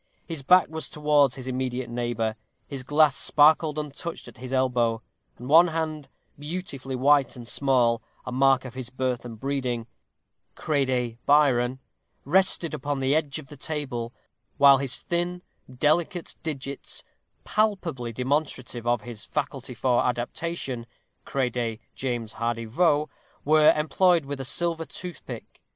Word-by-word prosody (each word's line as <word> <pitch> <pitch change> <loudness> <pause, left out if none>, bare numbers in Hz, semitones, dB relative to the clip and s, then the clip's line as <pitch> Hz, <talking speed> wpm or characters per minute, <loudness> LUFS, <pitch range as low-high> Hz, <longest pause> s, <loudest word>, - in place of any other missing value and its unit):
His 165 -4 -5
back 180 +6 +5
was 160 0 -4
towards 150 -3 +3
his 130 - -8
immediate 130 -1 -2
neighbor; 120 -2 -2 0.3
his 135 -2 -5
glass 145 +2 +4
sparkled 155 +2 +4
untouched 150 +2 -5
at - - -13
his 130 0 -7
elbow; 120 -4 +1 0.3
and 125 - -9
one 165 +5 +7
hand, 155 -3 -3 0.3
beautifully 145 -4 -5
white 140 +1 +3
and 120 -2 -9
small, 120 -4 +2 0.2
a - - -5
mark 135 +1 +3
of 125 - -7
his 130 -2 -6
birth 130 -2 -2
and 115 -3 -8
breeding 130 -4 -2 0.7
crede 130 -6 -1
Byron 130 -4 +4 0.5
rested 175 +1 +3
upon 145 -1 -2
the 135 +1 +1
edge 150 -2 0
of 155 -3 -9
the 145 - -10
table, 135 -6 -3 0.5
while 140 -1 +7
his 130 -2 -1
thin, 175 +1 -2 0.3
delicate 160 +7 0
digits, 140 -3 -5 0.4
palpably 185 - 0
demonstrative 125 -2 -2
of 120 -3 +1
his 115 -3 -6
faculty 135 -4 -4
of - - -5 0.2
adaptation 125 0 -3 0.4
crede 120 -4 -1
James 120 -4 -3
Hardy 115 0 -2
Vaux 150 +4 +2 0.3
were 155 +1 +6
employed 170 +1 +3
with 140 0 -5
a 135 - -3
silver 165 +4 +1
toothpick. 175 +4 -8
135 Hz, 135 wpm, -26 LUFS, 125-155 Hz, 0.7 s, one